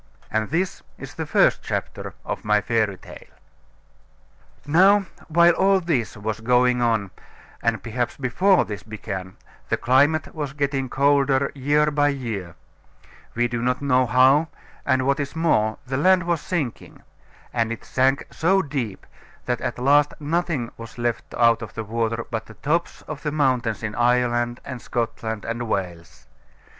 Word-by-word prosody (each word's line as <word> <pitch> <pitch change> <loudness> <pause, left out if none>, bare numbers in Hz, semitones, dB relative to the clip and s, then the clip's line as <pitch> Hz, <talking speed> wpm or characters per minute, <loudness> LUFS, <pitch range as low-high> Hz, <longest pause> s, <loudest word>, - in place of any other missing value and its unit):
And 110 0 0
this 175 +5 -1 0.2
is - - -9
the - - -5
first - - +3
chapter - - -5
of - - -4
my 105 0 +3
fairy 110 -3 0
tale. - - -13 1.4
Now 190 +7 +5 0.2
while 170 +1 +5
all 195 +2 +3
this 155 -12 -1
was 110 +1 -3
going 125 +1 +3
on, 110 -5 +1 0.5
and 115 -1 0
perhaps 120 +1 -3
before 180 +9 +3
this 105 -3 -6
began, 95 -4 -7 0.3
the - - +1
climate 140 +5 +2
was 145 -4 -4
getting 140 -2 -1
colder 140 0 +2
year 145 +2 +2
by 145 0 +2
year 115 -11 -4 0.8
we 120 +1 +2
do 120 -1 -3
not 125 +1 0
know 130 -3 +2
how; 130 +7 +5 0.4
and, 130 -1 +2
what 140 +2 +1
is 140 +1 -4
more, 110 -10 +1
the 130 +1 -2
land 185 +4 +4
was 170 -3 -1
sinking; 150 -10 -4 0.5
and 115 -2 0
it 115 - -6
sank 135 +2 +1
so 190 +4 +2
deep 130 -9 -4 0.4
that 125 -1 -1
at 120 - -3
last 145 +3 +3
nothing 155 -5 -1
was 115 +1 -10
left 120 -1 -2
out 115 -1 +4
of - - -8
the 110 - -3
water 115 +1 -2
but 115 -1 -3
the 115 - -13
tops 165 +7 -2
of 150 -2 -7
the 150 - -2
mountains 130 -7 0
in 105 -1 -3
Ireland, 120 0 +1
and 130 -2 -6
Scotland, 115 -3 -3
and 115 +1 -3
Wales. 90 -5 -4
125 Hz, 155 wpm, -23 LUFS, 115-145 Hz, 1.4 s, Now